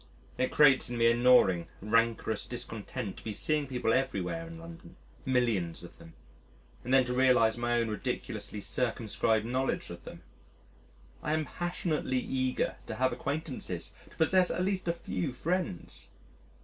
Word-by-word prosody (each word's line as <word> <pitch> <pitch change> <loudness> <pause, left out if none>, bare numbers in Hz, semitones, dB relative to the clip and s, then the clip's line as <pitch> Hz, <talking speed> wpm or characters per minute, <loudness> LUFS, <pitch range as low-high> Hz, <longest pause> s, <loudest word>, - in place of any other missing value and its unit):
It 130 - +2
creates 135 -5 +5
in 120 - -3
me 115 - +3
a - - +2
gnawing, 120 -8 +5
rancorous 115 0 +1
discontent 110 -4 -5
to - - -12
be 110 - -4
seeing 150 +6 0
people 125 -3 0
everywhere 130 - -1
in 165 0 -9
London 165 0 -11 0.3
millions 115 -10 +1
of - - -12
them 80 - -13 0.7
and 125 - -4
then 130 -1 +6
to 125 - -2
realise 125 -3 +4
my 120 0 +1
own 115 - +1
ridiculously 105 0 -4
circumscribed 110 -2 0
knowledge 130 +3 -1
of - - -9
them. - - -10 1.0
I 150 - -1
am 155 0 0
passionately 170 -6 -2
eager 130 0 -1
to - - -4
have 130 0 +1
acquaintances, 140 - -3 0.2
to - - -19
possess 180 +3 +4
at 180 - 0
least 190 -2 -1
a 170 - +2
few 95 - -3
friends. 170 - -3
125 Hz, 155 wpm, -30 LUFS, 110-150 Hz, 1.0 s, then